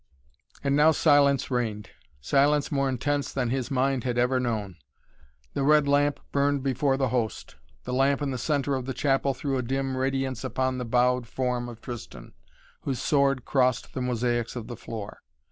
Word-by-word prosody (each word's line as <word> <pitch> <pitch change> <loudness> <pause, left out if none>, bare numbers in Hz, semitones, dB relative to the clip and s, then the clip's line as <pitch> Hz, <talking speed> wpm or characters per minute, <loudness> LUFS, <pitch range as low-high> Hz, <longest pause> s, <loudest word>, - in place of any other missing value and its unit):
And 140 0 +2
now 150 +2 +6
silence 145 -4 +3
reigned, 110 -5 -2 0.3
silence 140 - +2
more 140 -2 +1
intense 140 +3 -1
than 125 -3 -1
his 130 -1 -2
mind 135 -2 +1
had 125 -2 -2
ever 125 +1 +2
known. 110 -7 -3 0.8
The - - -2
red 150 +1 +4
lamp 145 0 +2
burned 140 -1 +1
before 135 0 +1
the 135 -2 +1
Host. 115 - -2 0.3
The 125 - -4
lamp 135 +2 +2
in 145 -2 -2
the 130 - -3
centre 145 +1 0
of 130 -1 -3
the 130 - -3
chapel 135 0 +1
threw 135 0 -2
a - - 0
dim 135 +2 -2
radiance 135 -1 -1
upon 130 0 -1
the 125 - -3
bowed 125 +1 +2
form 125 -1 -2
of 115 -1 -11
Tristan, 115 - -9 0.5
whose 135 -3 -3
sword 140 -3 +2
crossed 130 -2 +1
the 130 - -3
mosaics 120 -1 -1
of 120 -3 -5
the 120 +1 -7
floor. 110 -2 -8
130 Hz, 180 wpm, -26 LUFS, 120-140 Hz, 0.8 s, now